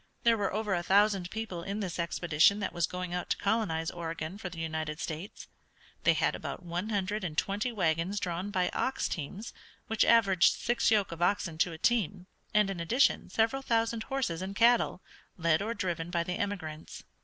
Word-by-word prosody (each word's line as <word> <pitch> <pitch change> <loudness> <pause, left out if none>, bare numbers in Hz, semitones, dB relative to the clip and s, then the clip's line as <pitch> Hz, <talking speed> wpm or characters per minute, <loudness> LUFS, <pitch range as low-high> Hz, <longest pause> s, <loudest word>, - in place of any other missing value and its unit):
There 235 -1 +5
were 205 -3 -1
over 210 0 -1
a 175 - +1
thousand 195 0 +3
people 215 -5 -5
in 200 +4 -4
this 185 -4 -4
expedition 170 +3 +3
that 205 - -3
was 170 -1 +1
going 180 -1 -5
out 180 - -3
to - - +1
colonize 195 -7 0
Oregon 165 +2 -5
for 190 - -5
the 170 - -11
United 160 -1 -3
States. 165 +5 -6 0.6
They - - +6
had - - +1
about - - -6
one 175 +4 -3
hundred 205 0 -1
and 160 -4 -4
twenty 205 +8 0
wagons 180 -1 0
drawn 180 +2 -3
by 185 -3 +1
ox 265 - -1
teams, 190 +9 -5 0.3
which 225 -1 +2
averaged 195 -6 +5
six 240 0 +1
yoke 210 -5 +2
of 165 0 -7
oxen 175 -3 0
to 175 - +2
a 160 - -7
team, 200 -3 +1 0.3
and, 210 -2 +3
in 185 - -5
addition, 230 +12 +2
several 230 +5 +1
thousand 230 -2 0
horses 245 - -1
and 190 +1 -5
cattle, 235 -5 +3 0.3
led 165 -1 +2
or 225 +3 -2
driven 175 -4 -2
by 170 -1 0
the 180 - -3
emigrants. 160 -6 -5
185 Hz, 190 wpm, -30 LUFS, 170-215 Hz, 0.6 s, They